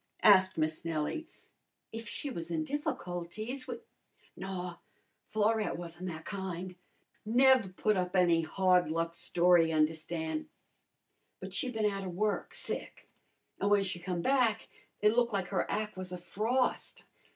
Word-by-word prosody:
asked 190 -3 +7
Miss 155 0 0
Nellie. 165 - -2 0.6
"If 225 +1 -6
she 285 - -4
was 170 -6 -5
in 160 -2 -1
difficulties 220 - -4
we 245 - -3 0.4
" - - -33
"Naw, 180 -2 -5 0.5
Florette 220 0 +1
wasn' 175 +1 -6
that 160 -2 -6
kind; 185 -2 -5 0.5
nev' 240 -4 +4
put 215 +2 +2
up 180 0 -1
any 175 -3 +4
hard 180 0 +3
luck 165 +1 -1
story 175 -1 +4
y' 160 - -1
un'erstan'. 160 - -1 0.9
But - - -8
she'd 255 -5 -1
bin 220 -1 0
outa 195 -2 -1
work, 205 +4 -1
sick. - - -5 0.5
An' 200 - +1
w'en 205 -1 +4
she 185 -2 -3
come 175 -1 -3
back 245 -5 +2 0.3
it 210 +1 +4
looked 240 -2 +2
like 195 -3 -1
her 195 - 0
ac' 215 0 -2
was 185 -1 -5
a 180 - -4
frost. 225 +8 -1
185 Hz, 150 wpm, -32 LUFS, 170-215 Hz, 0.9 s, asked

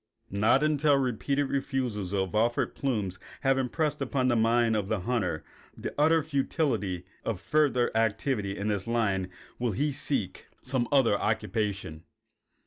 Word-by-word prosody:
Not 115 +8 +3
until 150 -1 +3
repeated 135 +2 0
refusals 125 -8 -2
of 95 -2 -1
offered 115 +2 +1
plumes 105 -9 -2 0.2
have 135 -1 +3
impressed 145 +3 -1
upon 130 -1 +1
the 120 - +3
mind 115 0 +3
of 105 -3 -1
the 105 -2 -1
hunter 90 -7 -1 0.3
the - - -5
utter 160 +2 +4
futility 130 - -1 0.2
of 110 -5 -2
further 125 0 +2
activity 110 -2 0
in 100 - -2
this 100 -1 -2
line 100 -6 0 0.3
will 120 -3 0
he 145 +9 0
seek 120 -9 -3 0.2
some 130 -2 -1
other 130 -7 +4
occupation. 105 -7 -2
120 Hz, 140 wpm, -28 LUFS, 100-135 Hz, 0.3 s, utter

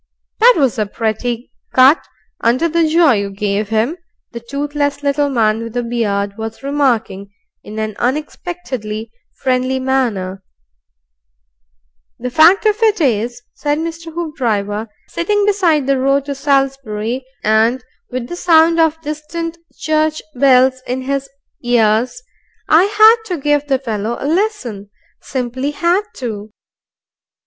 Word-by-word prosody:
"That 480 +2 +7
was 270 -7 +1
a 210 - 0
pretty 230 +3 -3 0.2
cut 265 +5 +5 0.4
under 250 +8 +3
the 335 0 +2
jaw 320 -1 +4
you 200 -3 0
gave 200 +1 -2
him," 225 +9 0 0.3
the 235 - -6
toothless 285 +3 -3
little 285 0 +1
man 225 -4 +1
with 230 -1 -7
the 245 0 -1
beard 205 -3 -2
was 225 +3 -6
remarking 230 -9 -1 0.3
in 215 - -9
an 215 -1 -3
unexpectedly 255 -5 -4 0.2
friendly 255 0 0
manner. 225 -8 -1 1.8
"The 250 +1 -5
fact 335 - +5
of 430 +1 +2
it 435 -3 +3
is," 240 -3 0
said 290 0 -1
Mr. 330 +1 -5
Hoopdriver, 230 -11 -2 0.2
sitting 410 +4 0
beside 355 -9 +2
the 275 -1 +1
road 275 +1 +2
to 285 - -3
Salisbury, 270 -4 -1 0.2
and 225 +4 +2 0.3
with 250 -1 -4
the 350 - -6
sound 330 -1 +4
of 320 -1 +2
distant 325 +2 -5 0.2
church 310 0 0
bells 260 0 +4
in 255 +1 -3
his 275 +1 -2 0.3
cars, 240 - +1 0.4
"I 325 +4 +5
had 430 +2 +6
to 365 -5 -3
give 290 0 0
the 270 -2 +2
fellow 230 -2 -3
a - - -5
lesson; 300 - -1 0.3
simply 260 +1 -3
had 340 +6 +1
to." 215 -4 -5
265 Hz, 135 wpm, -17 LUFS, 225-315 Hz, 1.8 s, That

